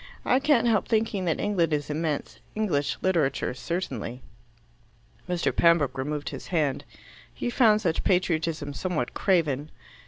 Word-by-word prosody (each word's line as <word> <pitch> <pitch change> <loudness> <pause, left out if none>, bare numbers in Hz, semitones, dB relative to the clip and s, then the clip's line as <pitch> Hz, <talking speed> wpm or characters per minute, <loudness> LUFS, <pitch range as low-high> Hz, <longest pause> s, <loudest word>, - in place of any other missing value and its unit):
I 255 - +4
can't 275 -4 +3
help 220 -3 +2
thinking 220 -4 0
that 165 - 0
England 180 -6 +1
is 150 0 -1
immense. 155 -1 -3 0.2
English 170 -10 0
literature 160 -11 +1
certainly." 125 - -4 1.1
Mr. 175 -1 0
Pembroke 170 -6 +4
removed 145 +2 -3
his - - -8
hand. 150 -6 0 0.5
He 240 - -3
found 220 -4 +4
such 170 -6 0
patriotism 160 -5 0
somewhat 155 -5 -2
craven. 155 -6 +1
165 Hz, 130 wpm, -26 LUFS, 145-190 Hz, 1.1 s, I